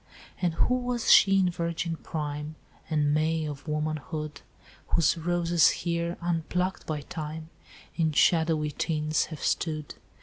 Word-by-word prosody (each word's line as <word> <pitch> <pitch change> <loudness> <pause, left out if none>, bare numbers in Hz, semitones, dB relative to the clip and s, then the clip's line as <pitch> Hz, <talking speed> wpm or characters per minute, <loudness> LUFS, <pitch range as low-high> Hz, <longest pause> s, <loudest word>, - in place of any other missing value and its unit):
"'And 175 -3 +1
who 250 - +2
was 245 -1 0
she 195 0 +7
in 185 -2 +3
virgin 170 -1 -2
prime 150 -1 -5 0.3
And 150 -2 +2
May 155 +1 +1
of 145 0 -7
womanhood, 150 0 -3 0.5
Whose 165 -3 +3
roses 170 0 +3
here, 170 0 -2
unplucked 175 +2 -1
by 150 -2 -2
time, 155 +1 -7 0.4
In 160 -2 +1
shadowy 160 -1 +3
tints 155 0 0
have 155 -3 -8
stood? 155 -3 -1
160 Hz, 130 wpm, -28 LUFS, 150-170 Hz, 0.5 s, she